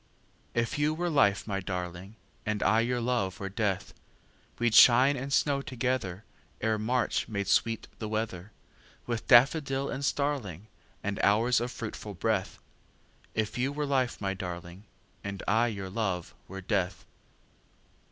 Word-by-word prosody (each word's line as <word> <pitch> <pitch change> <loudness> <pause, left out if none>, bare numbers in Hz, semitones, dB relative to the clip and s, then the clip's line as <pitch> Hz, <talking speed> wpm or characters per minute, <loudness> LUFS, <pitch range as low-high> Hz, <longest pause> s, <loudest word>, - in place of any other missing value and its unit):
If 115 +4 0
you 150 +1 +2
were 175 +1 -1
life, 100 -9 +3
my 100 -2 -2
darling, 90 +1 -5 0.3
And 110 -1 -1
I 110 +3 +4
your 120 +2 +1
love 115 -6 -1
were 95 - -4
death, 100 -2 -2 0.6
We'd 120 -2 +1
shine 130 +5 +7
and 135 +1 -5
snow 140 0 +2
togetherEre 110 -3 -3
March 120 +2 0
made 100 -3 -3
sweet 115 +2 +1
the 110 - -4
weatherWith 110 +2 -6
daffodil 135 +2 +4
and 135 - -4
starlingAnd 110 - -3
hours 115 +4 +3
of 120 - -2
fruitful 110 -3 -6
breath; 100 0 -1 0.8
If 110 +2 -1
you 130 +3 +1
were 150 +1 -2
life, 130 -3 0
my 95 -1 -1
darling, 90 0 -7 0.4
And 100 -1 -5
I 115 +3 +3
your 100 -4 -5
love 95 -5 -2
were 95 +1 -7
death. 95 -2 -1
110 Hz, 135 wpm, -29 LUFS, 95-125 Hz, 0.8 s, shine